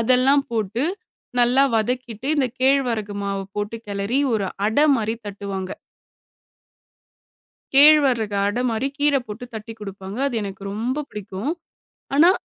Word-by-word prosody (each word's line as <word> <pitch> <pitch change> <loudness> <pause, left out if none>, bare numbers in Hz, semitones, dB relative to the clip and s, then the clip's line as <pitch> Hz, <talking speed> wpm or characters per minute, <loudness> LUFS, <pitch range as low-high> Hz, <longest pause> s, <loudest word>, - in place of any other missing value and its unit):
அதெல்லாம் 255 +4 +4
போட்டு 220 +1 -1 0.6
நல்லா 245 +3 +5
வதக்கிட்டு 245 +2 -2
இந்தக் 260 -3 0
கேழ்வரகு 245 -6 +2
மாவு 195 0 -2
போட்டு 210 +2 -2
கெலரி 200 +5 -1 0.2
ஒரு 205 -3 0 0.2
அட 220 +6 0 0.2
மாரி 220 -1 -1
தட்டுவாங்க. 195 -2 -5 2.0
கேழ்வரகு 270 -8 +6
அட 205 +4 -1
மாரி 230 +4 -1
கீர 290 0 +3
போட்டு 215 +4 -7
தட்டி 220 +1 -6
குடுப்பாங்க. 195 +1 -7
அது 275 - -2
எனக்கு 195 -1 -7
ரொம்ப 245 +8 -2
பிடிக்கும். 205 +5 -5 0.6
ஆனா, 325 +5 +7
225 Hz, 120 wpm, -22 LUFS, 205-260 Hz, 2.0 s, ஆனா